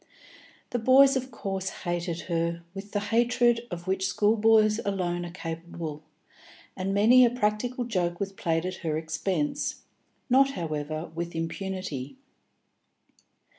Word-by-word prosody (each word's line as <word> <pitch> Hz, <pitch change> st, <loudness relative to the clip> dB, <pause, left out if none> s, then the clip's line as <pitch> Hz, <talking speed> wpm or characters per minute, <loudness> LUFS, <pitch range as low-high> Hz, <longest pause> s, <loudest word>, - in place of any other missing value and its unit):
The 245 Hz, -, 0 dB
boys 270 Hz, +4 st, +6 dB
of 260 Hz, 0 st, -2 dB
course 195 Hz, -5 st, -3 dB, 0.2 s
hated 175 Hz, -1 st, -2 dB
her 170 Hz, 0 st, -2 dB
with 200 Hz, +1 st, -8 dB
the 205 Hz, -, 0 dB
hatred 240 Hz, 0 st, +3 dB
of 175 Hz, -1 st, -6 dB
which 190 Hz, 0 st, 0 dB
schoolboys 215 Hz, +1 st, +4 dB
alone 180 Hz, -3 st, -1 dB
are -, -, -9 dB
capable, 165 Hz, -3 st, -6 dB, 0.7 s
and 185 Hz, +1 st, -2 dB
many 225 Hz, +6 st, +6 dB
a 240 Hz, -, +6 dB
practical 245 Hz, +2 st, -1 dB
joke 175 Hz, -6 st, -1 dB
was 195 Hz, -1 st, -2 dB
played 165 Hz, -2 st, -1 dB
at 185 Hz, 0 st, -3 dB
her 155 Hz, -3 st, -2 dB
expense, 160 Hz, 0 st, -2 dB, 0.4 s
not, 270 Hz, +1 st, +4 dB
however, 155 Hz, -, -4 dB
with 170 Hz, +1 st, -5 dB
impunity. 165 Hz, -5 st, -4 dB
190 Hz, 130 wpm, -27 LUFS, 170-225 Hz, 0.7 s, boys